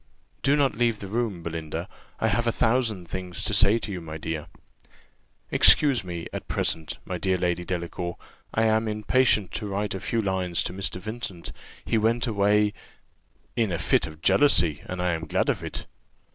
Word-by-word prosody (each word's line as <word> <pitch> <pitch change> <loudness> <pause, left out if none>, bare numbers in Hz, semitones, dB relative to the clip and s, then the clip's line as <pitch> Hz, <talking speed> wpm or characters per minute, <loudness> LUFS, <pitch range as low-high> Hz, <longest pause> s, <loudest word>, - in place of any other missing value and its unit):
"Do 140 +2 +3
not 140 -3 +2
leave 115 -1 +2
the 100 - -7
room, 105 -4 -2
Belinda; 80 +1 -4 0.3
I 110 - +2
have 120 +3 +1
a - - +4
thousand 110 -6 +1
things 90 0 -5
to 105 - -1
say 100 +2 +5
to 110 - -5
you, 90 -2 -4
my 80 -1 -7
dear." 80 -1 -4 1.0
"Excuse 135 -8 +5
me, 85 -2 -5
at - - -5
present, 80 -1 -1
my 90 -1 -4
dear 95 +2 +1
Lady 90 -1 0
Delacour; 85 0 -4 0.3
I 110 - +1
am 110 0 +2
impatient 105 -1 +2
to 105 - -3
write 100 +1 -2
a 95 - -4
few 115 - -1
lines 95 -4 +1
to - - -4
Mr. 95 -1 -2
Vincent. 110 -3 -6 0.3
He 115 - +2
went 115 +3 +2
away 105 -1 +2 0.4
" - - -40
"In 115 -5 +1
a 85 - 0
fit - - +2
of 80 0 -12
jealousy, 85 - +4
and 90 0 -3
I 90 - +2
am 80 0 -4
glad - - +1
of - - 0
it." - - -5
100 Hz, 185 wpm, -26 LUFS, 85-110 Hz, 1.0 s, say